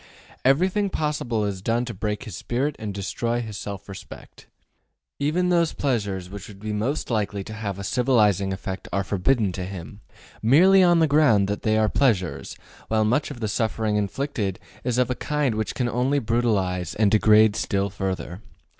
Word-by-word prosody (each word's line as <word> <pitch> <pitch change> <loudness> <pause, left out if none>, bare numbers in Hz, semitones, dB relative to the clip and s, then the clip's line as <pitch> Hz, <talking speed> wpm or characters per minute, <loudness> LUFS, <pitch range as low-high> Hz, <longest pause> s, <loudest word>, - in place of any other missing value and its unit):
Everything 185 +9 +2
possible 150 - -1
is 100 -2 -3
done 115 +4 0
to 120 - -5
break 105 +3 -3
his 110 -8 -8
spirit 125 +6 -2
and 110 -2 -4
destroy 100 +5 -2
his 110 -3 -5
self 100 -1 -6
respect. 100 -1 -11 0.7
Even 175 +5 +1
those 170 -2 +2
pleasures 100 -9 -2
which 100 +1 -9
would 100 -2 -12
be 105 +1 -4
most 120 +7 -2
likely 105 -3 -1
to 110 - -8
have 105 -3 -4
a 100 - -6
civilizing 105 -5 +2
effect 95 0 -5
are 100 - 0
forbidden 100 +2 +1
to 90 0 -5
him, 95 +2 -8 0.4
merely 180 - +6
on 175 -2 +5
the 165 - +4
ground 140 -10 +4
that 105 +1 -3
they 110 0 +2
are 110 0 +3
pleasures, 105 -8 0 0.3
while 110 -1 +2
much 125 +7 +1
of 130 -5 -9
the 110 - 0
suffering 110 0 -1
inflicted 105 -1 -2 0.3
is 125 -1 -1
of 125 0 +2
a - - +2
kind 150 -1 -1
which 110 0 -3
can 125 - 0
only 125 +4 +1
brutalize 105 -7 0
and 105 -2 +3
degrade 110 0 +5
still 100 0 -1
further. 95 -1 -4
110 Hz, 180 wpm, -24 LUFS, 100-130 Hz, 0.7 s, merely